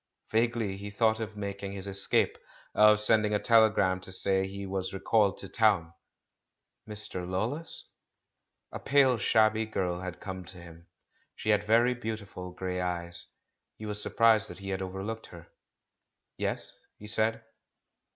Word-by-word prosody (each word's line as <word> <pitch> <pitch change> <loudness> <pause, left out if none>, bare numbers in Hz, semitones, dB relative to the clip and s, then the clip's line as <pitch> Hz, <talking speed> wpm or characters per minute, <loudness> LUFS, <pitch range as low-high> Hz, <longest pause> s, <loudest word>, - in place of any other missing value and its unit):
Vaguely 115 -3 +1
he 100 +1 -7
thought 110 +2 +2
of 110 -1 -5
making 100 -1 -5
his 100 -1 -6
escape, 100 0 +1 0.3
of 105 0 +6
sending 105 0 +3
a - - +2
telegram 110 -5 +4
to 95 - -10
say 95 +1 +1
he 100 +1 -6
was 95 0 -3
recalled 100 0 +2
to 95 - -7
town. 95 -6 +2 1.0
"Mr. 100 -4 -5
Lawless?" 120 - -3 0.9
A - - -6
pale, 135 -4 +3
shabby 110 +1 +3
girl 90 -5 -2
had 90 -1 -6
come 95 -2 -6
to 90 - -11
him. 85 -1 -13 0.5
She 110 - -4
had 105 -1 +3
very 115 +3 +4
beautiful 110 -6 -6
grey 90 0 -4
eyes; 85 -1 -4 0.5
he 110 - -9
was 105 0 -3
surprised 110 -2 +3
that 90 - -9
he 100 +1 -7
had 95 0 -2
overlooked 95 +4 -5
her. 85 -1 -13 0.9
"Yes?" - - -2 0.2
he 105 - -12
said. 110 +1 0
100 Hz, 150 wpm, -29 LUFS, 95-110 Hz, 1.0 s, of